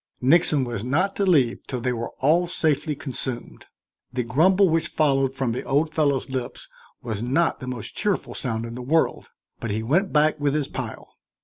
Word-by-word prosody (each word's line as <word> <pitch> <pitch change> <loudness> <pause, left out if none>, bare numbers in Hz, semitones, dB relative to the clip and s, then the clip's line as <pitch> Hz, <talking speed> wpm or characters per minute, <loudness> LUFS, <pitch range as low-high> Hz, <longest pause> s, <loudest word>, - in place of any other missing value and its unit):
Nixon 150 +1 +4
was 120 -4 -4
not 165 +11 0
to 200 - +1
leave 135 -10 +3
till 125 - -3
they 125 +1 -1
were 115 -1 -4
all 165 +6 +3
safely 155 -3 0
consumed. 130 -3 -5 0.4
The 125 0 -1
grumble 180 - +4
which 165 -1 +2
followed 135 -3 +1
from 130 -3 -1
the 120 - -3
old 150 +3 0
fellow's 140 -4 +1
lips 130 -2 -5 0.4
was 110 -3 -4
not 135 +8 +1
the 130 - -7
most 125 -4 -5
cheerful 205 -3 -1
sound 115 -3 -3
in 115 - -7
the 125 - -6
world, 155 +6 0 0.3
but 115 - -4
he 110 +2 -2
went 175 - +1
back 155 0 +3
with 145 0 +1
his 150 -3 0
pile. - - -7
135 Hz, 190 wpm, -24 LUFS, 125-160 Hz, 0.4 s, Nixon